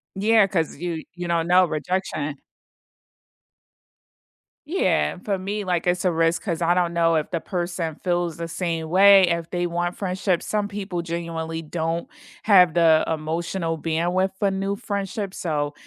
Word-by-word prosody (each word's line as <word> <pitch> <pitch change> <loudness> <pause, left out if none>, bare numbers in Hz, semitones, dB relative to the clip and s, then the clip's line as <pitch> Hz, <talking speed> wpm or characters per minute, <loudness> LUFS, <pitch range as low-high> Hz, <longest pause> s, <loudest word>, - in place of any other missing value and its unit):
Yeah, 210 +1 +4
'cause 170 -5 -1
you 170 -1 -4
you 175 -1 -5
don't 170 -1 0
know, 180 +1 +5
rejection. 155 -3 -3 2.3
Yeah, 75 - +1
for 200 -2 0
me, 205 +2 -3
like, 180 -2 -1
it's 175 +1 +1
a 180 - +3
risk 165 0 +1
'cause 175 -5 -3
I 170 +1 +3
don't 175 -1 +1
know 165 -1 +3
if 155 +1 -1
the 170 - -1
person 175 -3 -3
feels 175 -3 -1
the 170 0 -4
same 165 -1 -3
way. 195 +2 +7
If 170 -1 -1
they 175 -1 -1
want 175 +1 -2
friendship 185 -2 -1
some 210 -1 -1
people 195 -3 -4
genuinely 165 -1 -4
don't 165 +1 -3 0.4
have 180 -6 +6
the 165 -2 +5
emotional 165 +2 -2
bandwidth 175 +4 0
for 200 0 +1
new 195 +1 -2
friendships, 200 -1 -4
so 150 -3 -2
175 Hz, 155 wpm, -23 LUFS, 165-190 Hz, 2.3 s, way